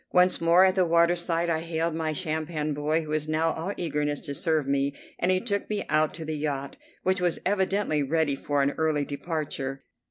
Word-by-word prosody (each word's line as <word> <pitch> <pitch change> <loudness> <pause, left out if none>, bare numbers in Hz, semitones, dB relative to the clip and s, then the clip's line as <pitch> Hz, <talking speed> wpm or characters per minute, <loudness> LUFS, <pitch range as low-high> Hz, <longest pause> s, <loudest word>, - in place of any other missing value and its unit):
Once 180 0 +4
more 170 +3 +6
at 190 - +3
the 185 -1 +3
waterside 170 0 +2
I 165 -2 +1
hailed 165 0 -2
my 160 -1 -1
sampan 155 -2 -2
boy, 150 +3 0
who 155 - -10
was 155 0 -1
now 160 +1 +1
all 165 +5 -3
eagerness 150 -3 -1
to 140 - -5
serve 155 0 +1
me, 140 0 0 0.2
and 180 - +1
he 185 0 +3
took 200 -1 -2
me 210 -1 -2
out 155 0 +2
to 165 - -6
the 155 0 -3
yacht, 140 -2 -3 0.3
which 185 0 +1
was 175 -2 +1
evidently 190 -4 +1
ready 145 0 +1
for 145 0 0
an 140 - +2
early 155 -2 +1
departure. 140 -3 -4
160 Hz, 200 wpm, -27 LUFS, 150-175 Hz, 0.3 s, more